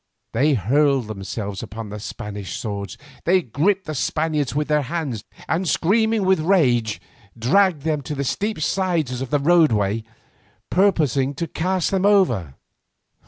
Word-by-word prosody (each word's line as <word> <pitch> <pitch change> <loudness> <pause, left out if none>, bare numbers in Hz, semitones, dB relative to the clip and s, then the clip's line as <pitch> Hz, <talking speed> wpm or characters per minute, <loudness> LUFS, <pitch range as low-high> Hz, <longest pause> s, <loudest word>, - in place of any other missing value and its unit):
They 140 +5 +3
hurled 135 +4 +2
themselves 100 -1 -5
upon 110 0 -7
the 105 +1 -6
Spanish 100 -2 -6
swords, 100 -3 -5 0.3
they 185 +1 +3
gripped 185 - 0
the 155 - -4
Spaniards 150 -1 -1
with 150 0 0
their 150 -1 +2
hands 140 -6 -3 0.2
and 175 +2 0
screaming 220 +3 +2
with 190 -1 +3
rage 125 - +2 0.4
dragged 155 - +2
them 155 -2 0
to 150 +2 -5
the 140 - -2
steep 205 +8 -2
sides 160 -9 0
of 135 - -4
the 145 - +2
roadway, 115 - +3 0.7
purposing 145 -8 +2
to 170 - -2
cast 180 +1 -1
them 195 0 +2
over. 120 - +2
145 Hz, 145 wpm, -22 LUFS, 115-180 Hz, 0.7 s, They